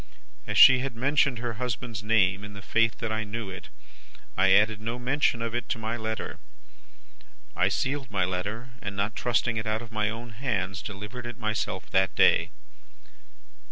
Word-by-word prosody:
"As -, -, -1 dB
she 130 Hz, -1 st, +9 dB
had 130 Hz, -2 st, -3 dB
mentioned 140 Hz, +1 st, +2 dB
her 120 Hz, -1 st, -4 dB
husband's 120 Hz, -3 st, -3 dB
name 100 Hz, -2 st, +2 dB
in 105 Hz, 0 st, -8 dB
the 100 Hz, -1 st, -10 dB
faith 115 Hz, +1 st, +2 dB
that 115 Hz, -, -3 dB
I 110 Hz, 0 st, -1 dB
knew 110 Hz, -1 st, -5 dB
it, 95 Hz, -, -9 dB, 0.7 s
I 95 Hz, +1 st, +4 dB
added 105 Hz, +2 st, +4 dB
no 115 Hz, +2 st, -3 dB
mention 125 Hz, -2 st, +1 dB
of 115 Hz, -1 st, -3 dB
it 120 Hz, -, -3 dB
to -, -, 0 dB
my 115 Hz, +1 st, -3 dB
letter. 110 Hz, -1 st, -4 dB, 1.2 s
I -, -, +3 dB
sealed 135 Hz, -1 st, -1 dB
my 95 Hz, -3 st, +1 dB
letter, 100 Hz, +7 st, -4 dB
and, 100 Hz, -1 st, -5 dB
not 100 Hz, +3 st, -1 dB
trusting 120 Hz, -1 st, 0 dB
it 110 Hz, 0 st, -3 dB
out 110 Hz, +2 st, -1 dB
of 115 Hz, -, -12 dB
my 110 Hz, -1 st, 0 dB
own 115 Hz, +2 st, -7 dB
hands, 100 Hz, -6 st, -2 dB
delivered 105 Hz, +4 st, -7 dB
it 120 Hz, -, -7 dB
myself 110 Hz, -3 st, -2 dB
that 95 Hz, 0 st, +2 dB
day. -, -, +4 dB
110 Hz, 180 wpm, -27 LUFS, 105-120 Hz, 1.2 s, she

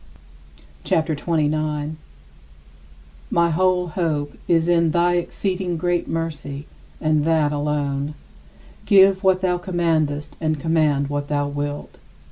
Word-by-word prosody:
CHAPTER 160 Hz, 0 st, +1 dB
XXIX 155 Hz, -1 st, 0 dB, 0.4 s
40. -, -, -7 dB, 1.3 s
My 170 Hz, 0 st, +2 dB
whole 180 Hz, +1 st, +2 dB
hope 155 Hz, -4 st, -2 dB
is 165 Hz, -1 st, +3 dB
in 170 Hz, -1 st, +3 dB
thy 175 Hz, +2 st, +2 dB
exceeding 180 Hz, 0 st, -2 dB
great 175 Hz, +1 st, 0 dB
mercy 150 Hz, -3 st, -4 dB, 0.3 s
and 155 Hz, -1 st, +2 dB
that 155 Hz, -2 st, +2 dB
alone. 145 Hz, -1 st, -2 dB, 0.7 s
Give 195 Hz, -1 st, +5 dB
what 190 Hz, -1 st, +3 dB
thou 180 Hz, -1 st, +1 dB
commandest 160 Hz, -5 st, -1 dB
and 155 Hz, -2 st, 0 dB
command 150 Hz, -3 st, +1 dB
what 145 Hz, 0 st, -2 dB
thou 145 Hz, -1 st, 0 dB
wilt. 145 Hz, 0 st, -5 dB
160 Hz, 115 wpm, -22 LUFS, 145-175 Hz, 1.3 s, Give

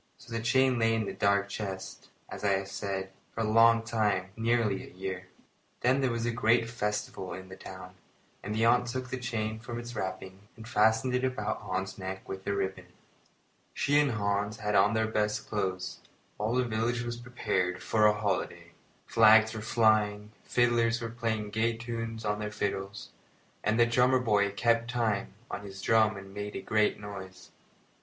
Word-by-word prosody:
So 115 Hz, -, -12 dB
the 115 Hz, -, -1 dB
chain 130 Hz, +2 st, +3 dB
lay 115 Hz, 0 st, +3 dB
in 110 Hz, -1 st, 0 dB
the -, -, -4 dB
dark 100 Hz, 0 st, +2 dB
chest, 95 Hz, -2 st, -6 dB, 0.2 s
as -, -, -8 dB
I 100 Hz, -1 st, +3 dB
have 95 Hz, 0 st, -1 dB
said, 95 Hz, -1 st, -4 dB, 0.2 s
for 115 Hz, -, -2 dB
a 110 Hz, -, 0 dB
long 115 Hz, +1 st, +5 dB
time 105 Hz, -5 st, 0 dB
nearly 115 Hz, -3 st, +1 dB
a -, -, -12 dB
year. 95 Hz, 0 st, -5 dB, 0.5 s
Then 130 Hz, +3 st, +3 dB
there 130 Hz, -, +2 dB
was 115 Hz, -1 st, -2 dB
a 120 Hz, -, +1 dB
great 115 Hz, 0 st, +3 dB
festival 105 Hz, -4 st, -3 dB
in 95 Hz, 0 st, -10 dB
the 95 Hz, -, -8 dB
town, 95 Hz, -1 st, -10 dB, 0.5 s
and 105 Hz, -, -4 dB
the 115 Hz, +1 st, +2 dB
aunt 125 Hz, +1 st, +4 dB
took 125 Hz, +1 st, -4 dB
the 130 Hz, -, -2 dB
chain 110 Hz, -3 st, -3 dB
from 120 Hz, +1 st, -6 dB
its 120 Hz, 0 st, -8 dB
wrappings 95 Hz, -1 st, -5 dB, 0.2 s
and 115 Hz, 0 st, -10 dB
fastened 110 Hz, +2 st, +3 dB
it 125 Hz, 0 st, +1 dB
about 130 Hz, -5 st, -1 dB
Hans's 95 Hz, 0 st, -4 dB
neck 95 Hz, 0 st, -6 dB
with 95 Hz, 0 st, -7 dB
a 100 Hz, -, +1 dB
ribbon. 95 Hz, -2 st, -3 dB, 0.9 s
She 145 Hz, +1 st, +3 dB
and 145 Hz, -4 st, +2 dB
Hans 100 Hz, 0 st, -1 dB
had 105 Hz, -1 st, -2 dB
on 105 Hz, +2 st, +4 dB
their 110 Hz, 0 st, +2 dB
best 105 Hz, -1 st, -1 dB
clothes, 95 Hz, -3 st, -2 dB
and -, -, -27 dB, 0.3 s
all 110 Hz, +3 st, 0 dB
the 125 Hz, 0 st, +2 dB
village 115 Hz, +2 st, -1 dB
was 120 Hz, 0 st, -4 dB
prepared 105 Hz, -7 st, -2 dB
for 105 Hz, -1 st, +4 dB
a 105 Hz, -, +5 dB
holiday. 100 Hz, -3 st, -2 dB, 0.3 s
Flags 110 Hz, 0 st, +6 dB
were 110 Hz, -, -5 dB
flying, 105 Hz, -2 st, +2 dB
fiddlers 120 Hz, -1 st, +2 dB
were 115 Hz, 0 st, -4 dB
playing 115 Hz, -3 st, -2 dB
gay 115 Hz, +2 st, +1 dB
tunes 115 Hz, -1 st, -5 dB
on 105 Hz, 0 st, 0 dB
their 105 Hz, 0 st, -3 dB
fiddles, 100 Hz, -1 st, -3 dB, 0.5 s
and 110 Hz, +2 st, +1 dB
the 120 Hz, -, +7 dB
drummer 125 Hz, +2 st, +4 dB
boy 105 Hz, -5 st, +2 dB
kept 115 Hz, +3 st, +1 dB
time 110 Hz, -6 st, -1 dB, 0.2 s
on -, -, -4 dB
his 95 Hz, -1 st, -9 dB
drum 110 Hz, 0 st, +3 dB
and 95 Hz, 0 st, -10 dB
made 105 Hz, 0 st, -5 dB
a -, -, -3 dB
great 110 Hz, 0 st, +2 dB
noise. 95 Hz, -3 st, -9 dB
110 Hz, 190 wpm, -30 LUFS, 100-115 Hz, 0.9 s, the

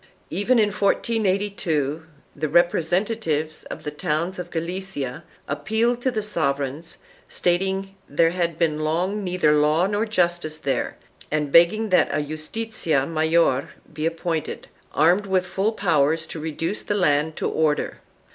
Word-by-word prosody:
Even 240 Hz, +6 st, +2 dB
in 215 Hz, -2 st, +4 dB
1482 195 Hz, -8 st, 0 dB, 0.3 s
the 155 Hz, +1 st, -2 dB
representatives 175 Hz, -1 st, +1 dB
of -, -, -8 dB
the 150 Hz, -, -4 dB
towns 170 Hz, +3 st, -2 dB
of 175 Hz, -1 st, -5 dB
Galicia 170 Hz, -5 st, -4 dB, 0.2 s
appealed 225 Hz, +10 st, 0 dB
to 260 Hz, -, +1 dB
the 220 Hz, -4 st, -2 dB
sovereigns, 145 Hz, -4 st, -2 dB, 0.3 s
stating 190 Hz, +2 st, 0 dB, 0.2 s
that 145 Hz, -, -15 dB
there 165 Hz, 0 st, +5 dB
had 170 Hz, -2 st, -1 dB
long 160 Hz, +3 st, +1 dB
been 210 Hz, -, -4 dB
neither 180 Hz, -4 st, +2 dB
law 150 Hz, +3 st, +3 dB
nor 205 Hz, +3 st, 0 dB
justice 175 Hz, -6 st, 0 dB
there 140 Hz, -3 st, -2 dB, 0.3 s
and 150 Hz, -2 st, -1 dB
begging 195 Hz, +8 st, +5 dB
that 185 Hz, -, +4 dB
a 145 Hz, -, 0 dB
justizia 155 Hz, -1 st, -1 dB
mayor 160 Hz, -3 st, +2 dB, 0.2 s
be 155 Hz, +1 st, -1 dB
appointed, 165 Hz, -1 st, -3 dB, 0.2 s
armed 175 Hz, +7 st, +3 dB
with 185 Hz, -1 st, +1 dB
full 195 Hz, +4 st, 0 dB
powers 160 Hz, -6 st, +1 dB
to 160 Hz, -, -7 dB
reduce 160 Hz, +5 st, -3 dB
the 205 Hz, -, -2 dB
land 155 Hz, -4 st, +2 dB
to -, -, -1 dB
order. 155 Hz, -2 st, 0 dB
170 Hz, 140 wpm, -23 LUFS, 155-195 Hz, 0.3 s, there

